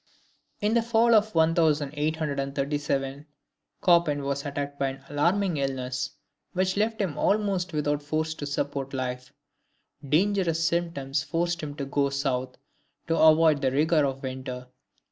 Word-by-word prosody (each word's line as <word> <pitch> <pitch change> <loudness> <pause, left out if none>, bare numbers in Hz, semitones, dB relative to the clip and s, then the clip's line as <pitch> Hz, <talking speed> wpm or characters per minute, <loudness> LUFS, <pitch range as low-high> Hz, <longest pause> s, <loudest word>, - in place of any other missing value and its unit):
In 210 +1 +1
the 235 - +4
fall 230 0 +3
of 215 -2 +3
1837, 145 -3 0 0.6
Chopin 170 -5 +4
was 140 0 -2
attacked 145 0 -4
by 140 - +1
an 135 0 -6
alarming 170 +4 +1
illness, 130 -2 -2 0.4
which 185 0 0
left 220 +2 0
him 190 -8 -2
almost 200 -4 +1
without 150 -1 0
force 155 +2 -2
to 145 -2 -6
support 140 -1 -3
life. 125 -1 -4 0.7
Dangerous 165 +2 +1
symptoms 155 -6 -1
forced 170 +3 -1
him 145 -2 -6
to 140 -2 -4
go 140 0 +1
South 130 -2 -2 0.5
to 165 - 0
avoid 155 -2 +5
the 130 -2 +1
rigor 155 +3 +3
of 135 -1 -2
winter. 130 -1 -6
150 Hz, 135 wpm, -26 LUFS, 140-170 Hz, 0.7 s, avoid